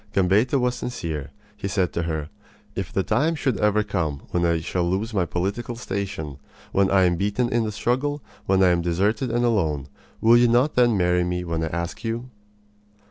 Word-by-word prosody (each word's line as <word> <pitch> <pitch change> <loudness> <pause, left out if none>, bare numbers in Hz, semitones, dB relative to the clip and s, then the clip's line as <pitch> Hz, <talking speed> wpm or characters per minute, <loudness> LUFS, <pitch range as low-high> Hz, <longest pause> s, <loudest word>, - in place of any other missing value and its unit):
Gambetta 100 +8 +3
was 125 0 +1
sincere. 85 - -4 0.3
He 100 - -4
said 95 -4 0
to 85 - -1
her: 80 -3 -3 0.5
"If 95 -3 -4
the 95 - 0
time 150 - +1
should 135 -6 -1
ever 105 0 +3
come 80 -9 -2
when 85 - +1
I 85 -1 +2
shall 90 +3 -1
lose 105 +5 -1
my 95 -4 +1
political 100 +8 -2
station, 100 - -4 0.3
when 100 0 +3
I 95 -1 +4
am 90 -1 +2
beaten 105 +6 0
in 120 -1 +1
the 105 - -2
struggle, 130 +7 -1 0.2
when 95 0 +4
I 90 - +6
am 85 -1 +2
deserted 100 +8 0
and 120 +1 +1
alone, 80 - 0 0.3
will 115 +1 +6
you 120 0 +5
not 125 +5 +3
then 120 -3 +4
marry 90 -1 +2
me 90 0 -2
when 85 -2 -2
I - - 0
ask 85 +1 -4
you?" 120 +2 -3
100 Hz, 195 wpm, -24 LUFS, 85-120 Hz, 0.5 s, I